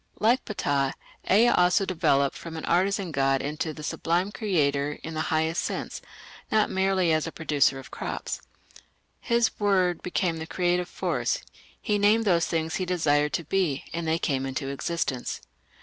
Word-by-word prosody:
Like 240 +4 +3
Ptah, 140 -9 0 0.4
Ea 225 +5 +6
also 180 +1 +3
developed 140 -7 +2
from 165 -1 -8
an 160 - -5
artisan 190 +1 +1
god 135 -1 +2
into 150 +3 -2
a 155 0 -7
sublime 175 +5 0
Creator 150 -10 0
in 165 - -6
the 155 - -1
highest 160 +1 +1
sense, - - -4 0.5
not 215 -1 +3
merely 190 -2 +2
as 155 +1 +1
a - - -4
producer 145 -4 +1
of 135 - -11
crops. - - -4 0.8
His 235 -1 +2
word 185 -4 +2
became 180 -2 -1
the 160 0 -6
creative 180 0 0
force; - - -1 0.4
he 210 -1 0
named 215 +3 +4
those 170 -4 +3
things 160 -1 -1
he 185 - -2
desired 150 -4 +2
to 170 - -1
be, 160 -4 0
and 170 0 -3
they 160 +1 +2
came 135 -5 -1
into 135 +1 -3
existence. 140 -2 -2
165 Hz, 165 wpm, -26 LUFS, 150-190 Hz, 0.8 s, Ea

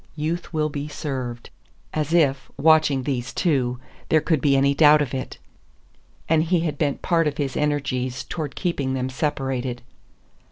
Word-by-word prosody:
Youth 160 +3 -3
will 155 -2 0
be 145 0 -4
served. 130 -5 -5 0.4
As 155 0 -1
if, 140 -5 +2
watching 155 -3 +4
these 125 -2 -2
two, 130 -8 0 0.3
there 155 - +5
could 155 -2 0
be 140 -2 +3
any 140 +1 +3
doubt 150 +1 +6
of 145 -4 -2
it! 130 -1 -4 0.9
And 160 -1 +3
he 170 0 +1
had 155 -4 -3
bent 145 -3 -1
part 165 -2 +2
of 145 0 -2
his 140 -3 -2
energies 130 -4 -1
toward 150 +2 -5
keeping 140 -7 -1
them 130 0 -2
separated. 130 -3 -2
145 Hz, 160 wpm, -23 LUFS, 130-155 Hz, 0.9 s, doubt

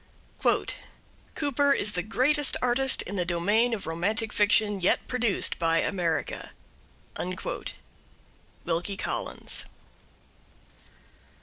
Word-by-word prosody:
Cooper 285 -1 +2
is 210 - 0
the 180 - -1
greatest 270 - +2
artist 250 +2 +2
in 200 +2 -5
the 180 - +1
domain 200 +8 +2
of 225 -4 -3
romantic 210 +7 -1
fiction 205 -1 +3
yet 175 - +2
produced 240 -5 +1
by 165 -1 +2
America. 170 -3 -1 2.1
Wilkie 175 +4 -2
Collins. - - -3
205 Hz, 90 wpm, -27 LUFS, 175-245 Hz, 2.1 s, fiction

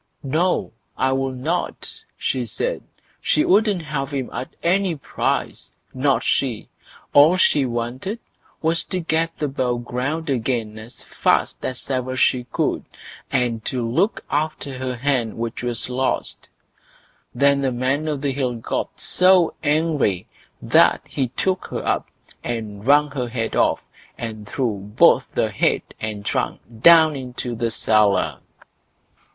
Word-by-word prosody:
"No! 165 +7 0 0.2
I 130 - +2
will 135 0 0
not", 140 +7 -3 0.2
she 125 -2 -1
said. - - -2 0.4
She 305 - +2
wouldn't 205 -2 +3
have 145 -3 -3
him 135 -3 -3
at 125 +2 -6
any 185 0 +2
price! 140 - -2 0.2
not 135 +1 +1
she; 125 -6 0 0.4
all 150 +6 +7
she 145 -6 +3
wanted 120 - -3 0.5
was 165 +1 +1
to 185 - -2
get 165 -1 0
above 130 -4 -1
ground 145 +7 -2
again 115 -4 -1
as 110 +3 -11
fast - - 0
as 130 -1 -4
ever 130 0 -1
she 125 -1 +2
could, - - -1 0.5
and 120 -3 0
to 125 -3 -1
look 195 - 0
after 145 -3 -2
her 130 -1 -2
hen 125 -3 0
which 115 0 -4
was 120 -2 -1
lost. 130 +1 -2 0.9
Then 140 0 +3
the 135 -1 +1
Man 130 +5 0
o' 150 -2 -1
the 140 0 -1
Hill 130 -2 -1
got 115 - -4
so 185 -2 +4
angry 150 - +1 0.4
that - - +4
he 135 -2 -1
took 185 +9 -1
her - - -5
up - - 0 0.4
and 110 -2 -5
wrung 145 +1 +5
her 130 -3 -2
head 115 -2 -2
off, - - +2 0.3
and 110 -2 -6
threw 115 -7 -1
both 105 +3 +4
head - - +1 0.2
and 105 -2 -5
trunk - - -1 0.2
down 160 0 +7
into 125 -2 -5
the 115 0 -1
cellar. 105 - +2
130 Hz, 140 wpm, -22 LUFS, 120-150 Hz, 0.9 s, all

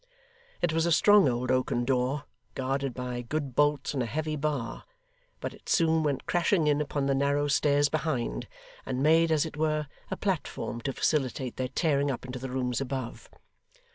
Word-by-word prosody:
It 170 -2 +2
was 165 +1 +2
a - - +1
strong 205 0 +6
old 125 +1 -1
oaken 130 -1 +1
door, 130 +2 0 0.3
guarded 135 +1 -1
by 125 -1 -4
good 140 +2 -3
bolts 145 +2 +2
and 135 - -1
a 120 - -1
heavy 155 +5 -2
bar, 140 -6 -2 0.6
but - - -4
it - - -13
soon 160 -1 +3
went 145 -3 -1
crashing 175 -1 +2
in 150 0 +3
upon 145 -1 -1
the 135 - +2
narrow 140 +1 +1
stairs 145 0 +3
behind, 135 - -2 0.4
and 130 0 -2
made, 165 +2 +4
as 155 0 +3
it 155 - -7
were, 155 -1 +1 0.2
a - - -3
platform 120 - -2
to 135 - -1
facilitate 130 -4 -1
their 130 - -1
tearing 145 -1 +1
up 130 -1 -3
into 125 0 -6
the 130 +1 -5
rooms 125 0 -1
above. 130 -2 -5
140 Hz, 180 wpm, -28 LUFS, 130-155 Hz, 0.6 s, strong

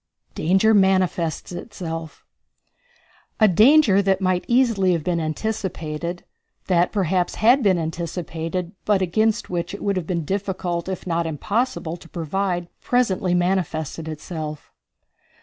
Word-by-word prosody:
Danger 195 +7 +3
Manifests 185 -5 +2
Itself. 165 -4 -7 1.1
A 215 - +6
danger 215 - +6
that 195 -1 +1
might 185 -2 0
easily 230 -7 +3
have 165 -3 -1
been 175 0 0
anticipated, 170 -1 -3 0.4
that 180 -1 +2
perhaps 185 -3 0
had 245 +5 +4
been 195 -5 +3
anticipated, 170 +1 -4
but 200 -3 +2
against 215 +5 0
which 175 +2 -2
it - - -9
would 200 -1 0
have 170 -3 -3
been 170 -4 -2
difficult, 185 -2 -2
if 190 - -5
not 170 -2 0
impossible, 175 - -2
to 165 - -16
provide, 175 +1 -2
presently 195 -7 +1
manifested 170 -4 -1
itself. 155 -1 -6
180 Hz, 125 wpm, -22 LUFS, 165-200 Hz, 1.1 s, A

